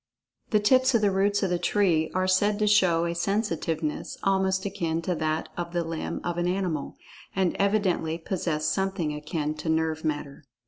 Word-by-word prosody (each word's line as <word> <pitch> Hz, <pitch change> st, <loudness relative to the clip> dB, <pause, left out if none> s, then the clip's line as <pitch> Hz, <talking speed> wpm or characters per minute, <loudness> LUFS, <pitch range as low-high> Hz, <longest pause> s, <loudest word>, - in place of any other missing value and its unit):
The 210 Hz, -, +3 dB
tips 255 Hz, +4 st, +4 dB
of 225 Hz, -, +4 dB
the 205 Hz, -1 st, +3 dB
roots 200 Hz, +2 st, +1 dB
of 190 Hz, -, 0 dB
the 175 Hz, -, +1 dB
tree 175 Hz, -4 st, +2 dB
are 185 Hz, 0 st, +1 dB
said 205 Hz, +3 st, +3 dB
to 215 Hz, -, +1 dB
show 185 Hz, -5 st, +4 dB
a 170 Hz, -, -1 dB
sensitiveness 170 Hz, -5 st, -2 dB
almost 190 Hz, 0 st, +1 dB
akin 170 Hz, -5 st, -1 dB
to 180 Hz, -, 0 dB
that 155 Hz, -1 st, -2 dB
of 175 Hz, 0 st, -5 dB
the 175 Hz, -1 st, 0 dB
limb 165 Hz, -1 st, -4 dB
of 175 Hz, 0 st, -2 dB
an 175 Hz, -, 0 dB
animal, 180 Hz, -5 st, -2 dB, 0.4 s
and 190 Hz, -3 st, +1 dB
evidently 195 Hz, -5 st, +1 dB
possess 165 Hz, -3 st, -2 dB
something 175 Hz, -1 st, 0 dB
akin 150 Hz, 0 st, -3 dB
to 160 Hz, -, -4 dB
nerve 160 Hz, 0 st, 0 dB
matter. 145 Hz, -2 st, -4 dB
175 Hz, 180 wpm, -26 LUFS, 160-195 Hz, 0.4 s, tips